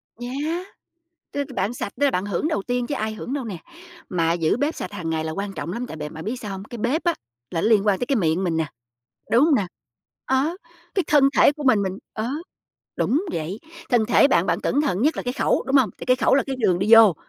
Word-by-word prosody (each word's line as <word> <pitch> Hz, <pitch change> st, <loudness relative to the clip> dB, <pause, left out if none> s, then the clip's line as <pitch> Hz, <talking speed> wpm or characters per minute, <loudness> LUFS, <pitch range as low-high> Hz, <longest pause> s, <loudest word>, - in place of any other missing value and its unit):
Yeah! 285 Hz, +9 st, -3 dB, 0.7 s
Tức 285 Hz, -1 st, -2 dB
bạn 200 Hz, +4 st, -1 dB
sạch 200 Hz, -, -4 dB
tức -, -, +4 dB
là 280 Hz, -, +4 dB
bạn 185 Hz, -3 st, -1 dB
hưởng 205 Hz, -, -1 dB
đầu 310 Hz, -11 st, -1 dB
tiên 245 Hz, +2 st, -1 dB
chứ 290 Hz, -, -2 dB
ai 220 Hz, -4 st, -2 dB
hưởng 240 Hz, -, -6 dB
đâu 280 Hz, -3 st, -3 dB
nè. 210 Hz, -5 st, -5 dB, 0.5 s
Mà 165 Hz, -2 st, +1 dB
giữ 165 Hz, +1 st, +1 dB
bếp 290 Hz, +5 st, 0 dB
sạch -, -, -6 dB
hàng 175 Hz, -5 st, -4 dB
ngày 160 Hz, -1 st, -1 dB
là 160 Hz, -, -3 dB
quan 195 Hz, +3 st, -4 dB
trọng 170 Hz, -2 st, -5 dB
lắm, 240 Hz, +5 st, -4 dB
tại 160 Hz, -, -8 dB
bạn 150 Hz, +1 st, -6 dB
bạn 160 Hz, -, -7 dB
biết 225 Hz, +5 st, -2 dB
sao 210 Hz, -, -6 dB
hông? 195 Hz, 0 st, -6 dB
Cái 235 Hz, +2 st, -9 dB
bếp 255 Hz, +9 st, 0 dB
á 345 Hz, -1 st, +2 dB, 0.4 s
là 165 Hz, -, -1 dB
nó -, -, +1 dB
liên 215 Hz, -2 st, +4 dB
quan 200 Hz, -2 st, +3 dB
tới 245 Hz, -, -2 dB
cái 275 Hz, -, +1 dB
miệng 175 Hz, -2 st, +1 dB
mình 170 Hz, -3 st, 0 dB
nè, 160 Hz, -1 st, 0 dB, 0.7 s
đúng 240 Hz, +5 st, +6 dB
hông 315 Hz, -2 st, +4 dB
nè? 205 Hz, -8 st, +1 dB, 0.6 s
Á, 270 Hz, +6 st, +1 dB, 0.4 s
cái 380 Hz, -, +1 dB
thân 280 Hz, -2 st, +5 dB
thể -, -, +6 dB
của 300 Hz, 0 st, -8 dB
mình, 225 Hz, -6 st, +4 dB
mình 190 Hz, 0 st, -3 dB
ờ, 220 Hz, +2 st, -3 dB, 0.7 s
đúng 310 Hz, +10 st, +1 dB
vậy. 165 Hz, +6 st, -3 dB, 0.3 s
Thân 235 Hz, -4 st, +3 dB
thể 245 Hz, +4 st, +5 dB
bạn 175 Hz, -8 st, +3 dB
bạn -, -, 0 dB
cẩn 285 Hz, -, +1 dB
thận 240 Hz, -8 st, 0 dB
nhất 305 Hz, +2 st, +2 dB
là -, -, -3 dB
cái 245 Hz, -, -2 dB
khẩu, -, -, +1 dB
đúng 275 Hz, -, +3 dB
hông? 255 Hz, -7 st, +4 dB
Tại -, -, -8 dB
cái 255 Hz, 0 st, +4 dB
khẩu -, -, +3 dB
là 275 Hz, -, +4 dB
cái 270 Hz, -1 st, -3 dB
đường 185 Hz, -7 st, +2 dB
đi 200 Hz, +4 st, +1 dB
vô, 220 Hz, -5 st, +8 dB
225 Hz, 265 wpm, -23 LUFS, 185-270 Hz, 0.7 s, vô